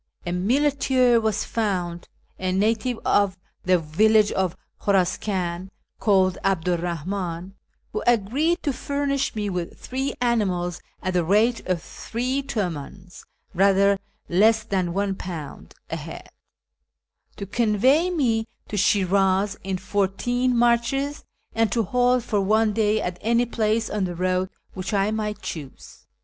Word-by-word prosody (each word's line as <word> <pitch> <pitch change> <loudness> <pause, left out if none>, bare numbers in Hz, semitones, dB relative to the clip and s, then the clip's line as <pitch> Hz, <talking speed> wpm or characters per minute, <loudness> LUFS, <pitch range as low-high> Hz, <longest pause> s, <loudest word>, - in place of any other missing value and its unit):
A 175 - -2
muleteer 255 +4 +2
was 220 -1 0
found, 180 -6 -2 0.3
a 185 0 -1
native 220 +5 +1
of 200 -3 +2 0.3
the 185 0 +4
village 210 +7 +3
of 185 -3 -1 0.2
Kliuraskan, 185 -2 0 0.3
called 190 -3 +3
'Abdu 180 -2 +1
'r - - +1
liahim, 175 +1 -4 0.4
who 215 - -2
agreed 250 - +2
to 285 - 0
furnish 280 0 -1
me 210 -1 -2
witli 180 -3 -4
three 265 +2 -3
animals 190 -8 0 0.2
at 185 - -1
the 175 -1 +2
rate 215 +7 +2
of 180 -3 -1
three 255 +4 -3
tuvidns 185 - -5 0.3
(rather 195 +1 +4 0.3
less 220 +5 +4
than 190 -5 -1
£1) 185 -6 -4 0.2
a - - -1
head, - - -8 1.1
to 200 - -6
convey 240 - +3
me 235 -10 +1 0.2
to 210 - -3
Shi'raz 195 0 +2
in 190 -1 -2
four 195 +1 0
teen 245 +6 0
marches, 240 +5 +1 0.3
and 225 -1 +1
to 230 - +1
halt 250 +3 +2
for 210 -3 0
one 215 +2 +2
day 215 0 +2
at 180 -3 -4
any 235 +2 +2
place 220 -1 0
on 205 -2 -1
the 175 -1 -4
road 185 +1 0 0.2
which 190 +2 -3
I 200 +1 +2
might 210 -1 -3
choose. 145 -5 -8
205 Hz, 135 wpm, -24 LUFS, 185-235 Hz, 1.1 s, the